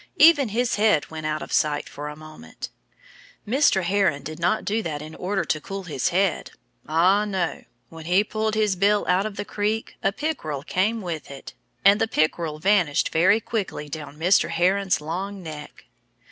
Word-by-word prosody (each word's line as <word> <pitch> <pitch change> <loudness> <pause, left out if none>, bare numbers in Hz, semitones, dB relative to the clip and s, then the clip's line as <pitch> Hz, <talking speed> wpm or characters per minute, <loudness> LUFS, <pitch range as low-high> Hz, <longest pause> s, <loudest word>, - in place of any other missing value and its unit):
Even 300 -5 +6
his 235 +3 0
head 210 -9 +2
went 155 -1 -4
out 155 0 -2
of - - -8
sight 150 -1 +1
for 145 +1 -7
a 150 - -6
moment. 155 - -10 0.8
Mr. 240 -5 +3
Heron 190 -5 +1
did 155 +2 -7
not 195 +6 +1
do 220 +2 0
that 155 -7 -4
in 155 +1 -9
order 190 0 -2
to 155 0 -1
cool 195 +3 -6
his 150 -8 -1
head. 190 0 0 0.4
Ah, 180 +6 +4
no! 190 -5 -2 0.2
When 160 -1 -11
he 180 +4 +3
pulled 215 0 -2
his 210 -3 +2
bill 205 +3 +2
out 185 +3 +2
of 210 - -8
the - - -4
creek 215 +2 -2
a 195 - +2
pickerel 195 - -4
came 210 +7 0
with 165 -4 -5
it. 140 -1 -10 0.3
And 200 +1 +6
the - - +2
pickerel 155 -4 0
vanished 180 -3 +2
very 185 +7 +4
quickly 205 -9 -4
down 150 -1 -7
Mr. 180 +5 +3
Heron's 185 +2 +1
long 190 +5 -5
neck. 155 -2 -9
185 Hz, 180 wpm, -24 LUFS, 155-205 Hz, 0.8 s, Even